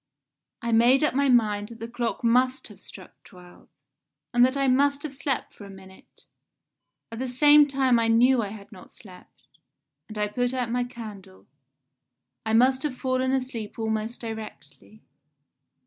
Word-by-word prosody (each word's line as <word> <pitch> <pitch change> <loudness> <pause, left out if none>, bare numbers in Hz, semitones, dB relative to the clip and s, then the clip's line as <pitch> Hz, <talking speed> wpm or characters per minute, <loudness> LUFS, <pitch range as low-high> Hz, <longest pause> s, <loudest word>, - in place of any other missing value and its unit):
I 235 - -2
made 240 +5 +4
up 300 - +1
my 280 +1 +1
mind 210 -4 +1
that 230 -1 -12
the 230 - -6
clock 235 0 -4
must 255 +3 +1
have - - -16
struck - - -13
twelve, 180 -1 -17 0.6
and 240 0 +4
that 260 +2 +2
I 275 -1 +1
must 280 +2 +2
have 300 -3 -6
slept 275 0 -3
for - - -14
a 200 - -11
minute 190 -1 -16 0.9
at 230 - -7
the 260 - -3
same 290 +4 +5
time 265 -3 +2
I 230 - +1
knew 240 +2 +4
I 210 - -3
had 205 0 -11
not 185 -4 -14
slept 185 -4 -16 0.6
and 215 - -10
I 210 0 0
put 245 +4 -2
out 245 -3 -2
my 245 0 -1
candle. 205 - -11 1.0
I 220 - -1
must 260 +3 +3
have 275 -3 -4
fallen 260 0 -1
asleep 255 -5 -4
almost 220 +1 -3
directly. 215 - -10
235 Hz, 165 wpm, -25 LUFS, 215-260 Hz, 1.0 s, same